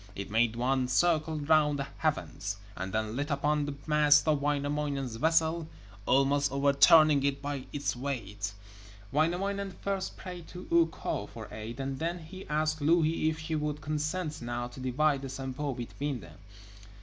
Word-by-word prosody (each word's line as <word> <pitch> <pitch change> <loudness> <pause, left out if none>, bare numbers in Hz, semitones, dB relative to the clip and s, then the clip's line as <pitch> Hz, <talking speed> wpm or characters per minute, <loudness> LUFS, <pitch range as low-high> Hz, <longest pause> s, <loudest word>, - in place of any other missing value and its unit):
It 100 0 -6
made 115 +1 +2
one 130 +2 +1
circle 160 +3 +2
round 150 -1 +3
the 140 - -2
heavens, 105 -10 -2 0.2
and 95 +1 -4
then 110 +2 -1
lit 145 +3 -2
upon 145 +1 +1
the 145 - -4
mast 150 -1 +5
of 150 -2 +3
Wainamoinen's 145 -3 -1
vessel, 160 +3 +2 0.4
almost 140 +1 +3
overturning 140 +2 +6
it 140 0 +1
by 140 -2 -4
its 145 -3 -2
weight. 105 -6 -4 0.6
Wainamoinen 190 +5 0
first 195 -1 -2
prayed 180 -3 -8
to 180 0 -9
Ukko 165 -1 +1
for - - -9
aid, 110 +4 -7
and 135 0 -3
then 170 +2 -1
he 185 +3 -10
asked 155 0 0
Louhi 160 +1 +3
if 160 - -3
she 160 0 -5
would 150 -1 -2
consent 155 +2 -2
now 120 0 -3
to 125 - -11
divide 135 +3 +1
the 135 - -5
Sampo 135 +1 -4
between 130 +3 -4
them. - - -14
145 Hz, 160 wpm, -30 LUFS, 135-155 Hz, 0.6 s, overturning